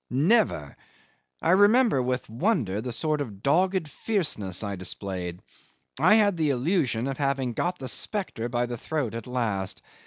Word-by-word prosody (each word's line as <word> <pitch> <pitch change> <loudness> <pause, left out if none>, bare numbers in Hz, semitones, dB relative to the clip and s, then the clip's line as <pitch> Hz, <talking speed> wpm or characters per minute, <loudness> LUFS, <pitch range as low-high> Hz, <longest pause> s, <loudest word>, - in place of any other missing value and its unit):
Never! 145 - +2 0.7
I - - +3
remember 205 - +5
with 125 0 -2
wonder 115 - 0
the 125 +1 -4
sort 150 +4 0
of 105 -7 -7
dogged 180 +4 +2
fierceness 140 - -1
I 100 -1 -3
displayed. 90 -1 -4 0.6
I 185 +9 +6
had 205 -4 +3
the 155 -2 +1
illusion 130 - 0
of 135 +1 -4
having 135 -3 0
got 175 +9 -1
the 130 - -6
spectre 125 - -2
by 120 0 0
the 120 0 -5
throat 145 -4 -3
at 115 0 -6
last. 110 -7 -2
130 Hz, 155 wpm, -26 LUFS, 110-175 Hz, 0.7 s, I